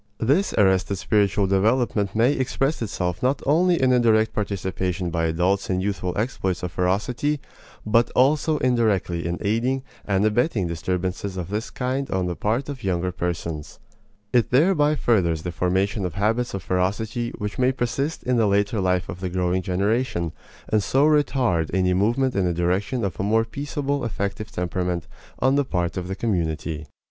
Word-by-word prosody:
This 145 Hz, -, +2 dB
arrested 95 Hz, 0 st, +3 dB
spiritual 100 Hz, 0 st, +2 dB
development 105 Hz, +1 st, +1 dB
may 120 Hz, +5 st, +4 dB
express 135 Hz, +2 st, -1 dB
itself 90 Hz, -5 st, -2 dB
not 130 Hz, +2 st, +1 dB
only 170 Hz, +4 st, +3 dB
in 130 Hz, -1 st, +3 dB
a 125 Hz, -, +4 dB
direct 110 Hz, -2 st, +3 dB
participation 95 Hz, -3 st, -2 dB
by 80 Hz, 0 st, 0 dB
adults 90 Hz, +5 st, 0 dB
in 90 Hz, -1 st, +1 dB
youthful 95 Hz, -2 st, -2 dB
exploits 95 Hz, -6 st, -2 dB
of 90 Hz, -, -3 dB
ferocity, 110 Hz, -, 0 dB, 0.5 s
but 115 Hz, +2 st, +3 dB
also 150 Hz, +4 st, +3 dB
indirectly 110 Hz, -, +1 dB
in 85 Hz, +1 st, -2 dB
aiding 120 Hz, +6 st, 0 dB, 0.2 s
and 100 Hz, 0 st, +1 dB
abetting 110 Hz, -, +1 dB
disturbances 90 Hz, +3 st, -3 dB
of 90 Hz, -1 st, -4 dB
this 105 Hz, +3 st, -3 dB
kind 130 Hz, +2 st, -2 dB
on 95 Hz, -1 st, 0 dB
the 90 Hz, -1 st, -2 dB
part 115 Hz, +9 st, -1 dB
of 140 Hz, -3 st, -7 dB
younger 90 Hz, -1 st, 0 dB
persons. 85 Hz, -3 st, -4 dB, 0.6 s
It 120 Hz, -2 st, +3 dB
thereby 150 Hz, +1 st, +3 dB
furthers 85 Hz, -, +1 dB
the 90 Hz, -, -3 dB
formation 95 Hz, +4 st, 0 dB
of 90 Hz, -3 st, -3 dB
habits 110 Hz, +3 st, 0 dB
of 95 Hz, -, -5 dB
ferocity 105 Hz, +7 st, -1 dB
which 105 Hz, +2 st, -5 dB
may 130 Hz, +1 st, +4 dB
persist 135 Hz, +4 st, -2 dB
in 125 Hz, -1 st, +1 dB
the 110 Hz, -2 st, +3 dB
later 100 Hz, +1 st, +1 dB
life 90 Hz, -1 st, +1 dB
of 90 Hz, -, -7 dB
the 90 Hz, 0 st, -3 dB
growing 90 Hz, 0 st, 0 dB
generation, 95 Hz, -1 st, 0 dB, 0.4 s
and 110 Hz, -1 st, +2 dB
so 135 Hz, +8 st, +2 dB
retard 130 Hz, -, +2 dB
any 90 Hz, -1 st, +2 dB
movement 120 Hz, +7 st, +1 dB
in 100 Hz, -2 st, +1 dB
the 90 Hz, -1 st, 0 dB
direction 95 Hz, +7 st, 0 dB
of 90 Hz, -6 st, -4 dB
a -, -, 0 dB
more 110 Hz, +3 st, +2 dB
peaceable 140 Hz, +2 st, -3 dB
effective 105 Hz, -1 st, -3 dB
temperament 90 Hz, -1 st, -2 dB, 0.3 s
on 130 Hz, +2 st, +2 dB
the 145 Hz, 0 st, +3 dB
part 90 Hz, -9 st, -2 dB
of 90 Hz, -2 st, -4 dB
the 95 Hz, -, -3 dB
community. 80 Hz, -7 st, -2 dB
100 Hz, 170 wpm, -23 LUFS, 90-125 Hz, 0.6 s, may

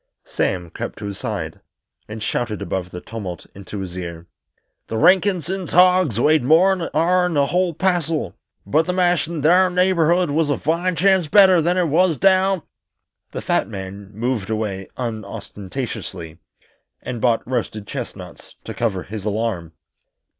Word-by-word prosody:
Sam 90 Hz, -3 st, -2 dB
crept -, -, -6 dB
to -, -, -7 dB
his 100 Hz, -1 st, -6 dB
side -, -, -4 dB, 0.5 s
and 110 Hz, 0 st, -7 dB
shouted 110 Hz, -2 st, -2 dB
above 90 Hz, -2 st, -3 dB
the 90 Hz, 0 st, -8 dB
tumult 100 Hz, -6 st, -7 dB
into 100 Hz, +1 st, -7 dB
his 90 Hz, -2 st, -7 dB
ear: 85 Hz, -2 st, -6 dB, 0.6 s
"The 110 Hz, -, -3 dB
Rankinses' 185 Hz, -, +2 dB
hogs 180 Hz, -, +4 dB
weighed 150 Hz, +1 st, +3 dB
more'n 175 Hz, +5 st, +3 dB
ourn 180 Hz, -1 st, +2 dB
a 140 Hz, -, +4 dB
whole 175 Hz, +2 st, 0 dB
passel, 165 Hz, -, 0 dB, 0.3 s
but 155 Hz, -, +2 dB
the 180 Hz, -, 0 dB
mast 175 Hz, -4 st, +2 dB
in 165 Hz, -4 st, -5 dB
thar 180 Hz, +4 st, +5 dB
neighborhood 180 Hz, -2 st, +2 dB
was 155 Hz, 0 st, +1 dB
a 145 Hz, -, +1 dB
fine 170 Hz, +4 st, 0 dB
chance 190 Hz, -1 st, +3 dB
better 190 Hz, 0 st, +6 dB
than 175 Hz, +3 st, +1 dB
what 180 Hz, -, +3 dB
it 165 Hz, -, -1 dB
was 165 Hz, +1 st, +3 dB
down 190 Hz, +1 st, +3 dB, 0.3 s
" -, -, -53 dB
The -, -, -5 dB
fat -, -, +1 dB
man 100 Hz, -1 st, -8 dB
moved 110 Hz, -1 st, -2 dB
away 105 Hz, -4 st, -3 dB
unostentatiously, 100 Hz, -6 st, -6 dB, 0.6 s
and 120 Hz, -3 st, -5 dB
bought 115 Hz, -2 st, +2 dB
roasted 115 Hz, -4 st, -3 dB
chestnuts -, -, -8 dB
to -, -, -6 dB
cover 100 Hz, -6 st, -1 dB
his 105 Hz, -1 st, -7 dB
alarm. 105 Hz, -6 st, -2 dB
140 Hz, 155 wpm, -21 LUFS, -, 0.6 s, better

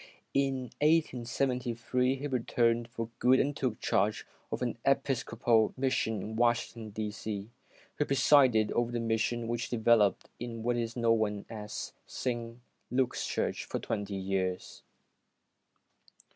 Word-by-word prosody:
In 135 Hz, -3 st, 0 dB
1873 125 Hz, -4 st, +1 dB
he 135 Hz, +2 st, -6 dB
returned 120 Hz, -3 st, +1 dB
for 115 Hz, -1 st, -5 dB
good 130 Hz, +1 st, +5 dB
and 145 Hz, +1 st, +1 dB
took 125 Hz, -6 st, -2 dB
charge 105 Hz, +2 st, +1 dB, 0.3 s
of -, -, -2 dB
an 120 Hz, -1 st, -2 dB
Epis 135 Hz, -1 st, +2 dB
copal 115 Hz, -1 st, +2 dB
Mission 115 Hz, -6 st, 0 dB
in 110 Hz, +1 st, -5 dB
Washington, 115 Hz, -1 st, 0 dB
D. 105 Hz, 0 st, -3 dB
C. 105 Hz, 0 st, -5 dB, 0.5 s
He 150 Hz, -, +3 dB
presided 130 Hz, -5 st, +4 dB
over 120 Hz, 0 st, 0 dB
this 120 Hz, -, -1 dB
Mission, 115 Hz, +1 st, 0 dB
which 120 Hz, 0 st, -2 dB
developed 110 Hz, -4 st, +3 dB
into 115 Hz, -1 st, -5 dB
what 120 Hz, +2 st, +1 dB
is 115 Hz, -1 st, -2 dB
now 115 Hz, -2 st, +3 dB, 0.8 s
St. 120 Hz, -2 st, -4 dB, 0.3 s
Luke's 130 Hz, 0 st, 0 dB
Church, -, -, -1 dB
for -, -, -3 dB
twenty 100 Hz, -1 st, -3 dB
two 95 Hz, 0 st, -5 dB
years. 95 Hz, -2 st, -2 dB
120 Hz, 130 wpm, -31 LUFS, 110-125 Hz, 0.8 s, good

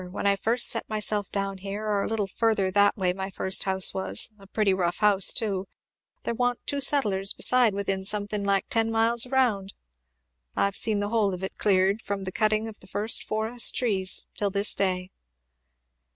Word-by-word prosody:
when 195 Hz, -, -6 dB
I 200 Hz, 0 st, +4 dB
first 230 Hz, +5 st, +1 dB
set 230 Hz, -, -3 dB
myself 210 Hz, -1 st, -2 dB
down 195 Hz, -1 st, -3 dB
here, 200 Hz, +2 st, -6 dB
or 205 Hz, -2 st, 0 dB
a -, -, -2 dB
little 220 Hz, -2 st, -1 dB
further 200 Hz, -1 st, 0 dB
that 205 Hz, +2 st, +3 dB
way 185 Hz, -2 st, 0 dB
my 190 Hz, +1 st, -5 dB
first 190 Hz, 0 st, +1 dB
house 190 Hz, -1 st, +2 dB
was, 190 Hz, +3 st, -3 dB
a 195 Hz, -, -16 dB
pretty 200 Hz, -1 st, +1 dB
rough 175 Hz, -2 st, -1 dB
house, 205 Hz, -3 st, +4 dB
too, 195 Hz, -5 st, -2 dB, 0.6 s
there -, -, -2 dB
wa'n't 245 Hz, +1 st, -2 dB
two 285 Hz, 0 st, -1 dB
settlers 205 Hz, -9 st, +3 dB
beside 245 Hz, -5 st, +3 dB
within 195 Hz, -1 st, -2 dB
something 205 Hz, +1 st, -1 dB
like 200 Hz, -1 st, +1 dB
ten 225 Hz, -1 st, 0 dB
miles 225 Hz, +2 st, +1 dB
round. 240 Hz, -7 st, 0 dB, 0.8 s
I've 200 Hz, -1 st, 0 dB
seen 210 Hz, -2 st, +3 dB
the 205 Hz, -, -2 dB
whole 210 Hz, -4 st, +1 dB
of 180 Hz, -, -10 dB
it 190 Hz, -, -5 dB
cleared, 195 Hz, +1 st, +2 dB
from 200 Hz, -1 st, -4 dB
the 185 Hz, -, -4 dB
cutting 215 Hz, +2 st, 0 dB
of 220 Hz, -1 st, -10 dB
the -, -, -12 dB
first 210 Hz, +2 st, +1 dB
forest 220 Hz, +3 st, -2 dB
trees 195 Hz, -6 st, 0 dB
till 205 Hz, -, 0 dB
this 200 Hz, +1 st, +2 dB
day." 185 Hz, -1 st, -1 dB
205 Hz, 190 wpm, -26 LUFS, 195-225 Hz, 0.8 s, I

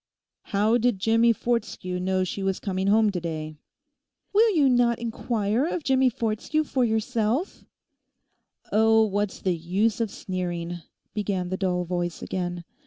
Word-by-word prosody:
'How 215 Hz, +4 st, +2 dB
did 240 Hz, -3 st, +2 dB
Jimmie 225 Hz, +4 st, +3 dB
Fortescue 225 Hz, -6 st, -2 dB
know 185 Hz, +1 st, 0 dB
she 185 Hz, +2 st, -4 dB
was 195 Hz, -1 st, -1 dB
coming 190 Hz, -1 st, -2 dB
home 215 Hz, +1 st, +4 dB
to 180 Hz, -3 st, -3 dB
day?' 155 Hz, -2 st, -5 dB, 0.7 s
'Will 435 Hz, 0 st, +4 dB
you 290 Hz, -4 st, +4 dB
not 240 Hz, -2 st, +3 dB
inquire 230 Hz, +1 st, -1 dB
of 345 Hz, -2 st, -3 dB
Jimmie 265 Hz, -1 st, +3 dB
Fortescue 230 Hz, +7 st, -1 dB
for 265 Hz, -4 st, 0 dB
yourself?' 225 Hz, -, -1 dB, 1.1 s
'Oh, 220 Hz, +1 st, +5 dB
what 205 Hz, -1 st, -1 dB
is -, -, -13 dB
the 185 Hz, -2 st, +1 dB
use 195 Hz, +8 st, 0 dB
of 225 Hz, -, 0 dB
sneering?' 175 Hz, -3 st, -4 dB, 0.3 s
began 195 Hz, -4 st, -2 dB
the 185 Hz, -, -1 dB
dull 180 Hz, -2 st, 0 dB
voice 175 Hz, -1 st, -3 dB
again. 175 Hz, -2 st, -3 dB
210 Hz, 150 wpm, -25 LUFS, 185-235 Hz, 1.1 s, Oh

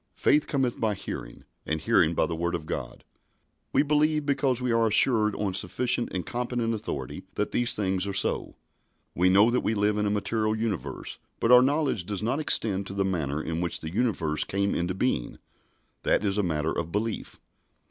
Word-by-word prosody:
"Faith 150 Hz, +1 st, +2 dB
cometh 130 Hz, -4 st, -1 dB
by 110 Hz, -2 st, 0 dB
hearing, -, -, -7 dB, 0.2 s
and 80 Hz, 0 st, -3 dB
hearing 85 Hz, 0 st, +3 dB
by -, -, +2 dB
the 85 Hz, -, -3 dB
Word 85 Hz, +1 st, -1 dB
of 80 Hz, -3 st, -5 dB
God." -, -, -6 dB, 0.7 s
We -, -, +3 dB
believe 150 Hz, 0 st, +1 dB
because 135 Hz, -3 st, +1 dB
we 125 Hz, -1 st, -1 dB
are 115 Hz, 0 st, +3 dB
assured 110 Hz, -1 st, +4 dB
on 100 Hz, -3 st, -2 dB
sufficient 120 Hz, +5 st, 0 dB
and 90 Hz, -2 st, -3 dB
competent 120 Hz, -1 st, -2 dB
authority 70 Hz, -, -5 dB
that -, -, -1 dB
these 120 Hz, -1 st, +3 dB
things 95 Hz, -1 st, -1 dB
are 100 Hz, -, -3 dB
so. 100 Hz, -, +2 dB, 0.6 s
We 90 Hz, +2 st, +3 dB
know 100 Hz, +5 st, +5 dB
that 125 Hz, -, +2 dB
we 110 Hz, -, -1 dB
live 105 Hz, 0 st, +1 dB
in 105 Hz, -, +1 dB
a -, -, +1 dB
material 110 Hz, +1 st, 0 dB
universe, 110 Hz, -4 st, -4 dB, 0.2 s
but 115 Hz, -, +2 dB
our 125 Hz, 0 st, +9 dB
knowledge 135 Hz, -, 0 dB
does 105 Hz, 0 st, -4 dB
not 125 Hz, +6 st, 0 dB
extend 100 Hz, -9 st, +1 dB
to -, -, -6 dB
the 100 Hz, 0 st, 0 dB
manner 80 Hz, -6 st, -2 dB
in 80 Hz, +1 st, -3 dB
which 85 Hz, -, -1 dB
the 80 Hz, +1 st, -6 dB
universe 90 Hz, -10 st, 0 dB
came 100 Hz, +1 st, -1 dB
into 90 Hz, +2 st, -2 dB
being. 95 Hz, -, -1 dB, 0.6 s
That 105 Hz, -, +1 dB
is 100 Hz, +1 st, +1 dB
a -, -, +4 dB
matter 80 Hz, -4 st, -1 dB
of 85 Hz, 0 st, -3 dB
belief. 105 Hz, +3 st, -3 dB
105 Hz, 195 wpm, -27 LUFS, 90-120 Hz, 0.7 s, our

